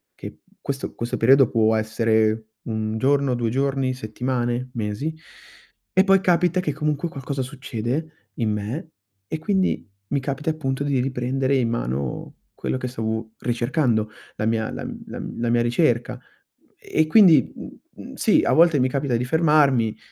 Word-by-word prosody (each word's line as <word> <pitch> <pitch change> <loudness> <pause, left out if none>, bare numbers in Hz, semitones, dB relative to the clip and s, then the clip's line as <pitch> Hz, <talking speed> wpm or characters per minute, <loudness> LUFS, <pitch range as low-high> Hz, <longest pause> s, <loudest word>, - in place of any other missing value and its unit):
che - - -9 0.2
questo 140 0 -4
questo 120 +1 -3
periodo 135 +2 +5
può 110 -1 +3
essere 110 0 +1 0.3
1 110 0 -2
giorno, 140 +1 +2
2 120 -2 -1
giorni, 135 0 0
settimane, 125 +1 -2
mesi, 115 +8 -3 0.8
e 190 - +5
poi 195 -1 +5
capita 180 0 +2
che 150 - -1
comunque 150 +2 -1
qualcosa 135 -1 -4
succede 135 +3 -5
in 110 -3 0
me 110 +10 -4 0.4
e 160 - -4
quindi 190 - 0 0.2
mi 140 - +1
capita 140 +3 -3
appunto 135 -3 -2
di 140 -3 +1
riprendere 130 +1 0
in 120 -3 +1
mano 65 - -3 0.2
quello - - -2
che 125 - -4
stavo 110 -2 -3
ricercando, 120 -2 0 0.3
la 110 - -1
mia 110 0 0
la - - -6
m - - -7 0.4
la 120 0 0
mia 120 0 +3
ricerca. 120 0 +1 0.6
E 155 0 0
quindi, 165 - +6
mh, - - -12
mh, - - -10
sì, - - +3
a - - +2
volte 165 -3 +5
mi 130 - +2
capita 135 -2 -1
di 120 - -2
fermarmi 140 -6 +3
130 Hz, 155 wpm, -23 LUFS, 115-145 Hz, 0.8 s, quindi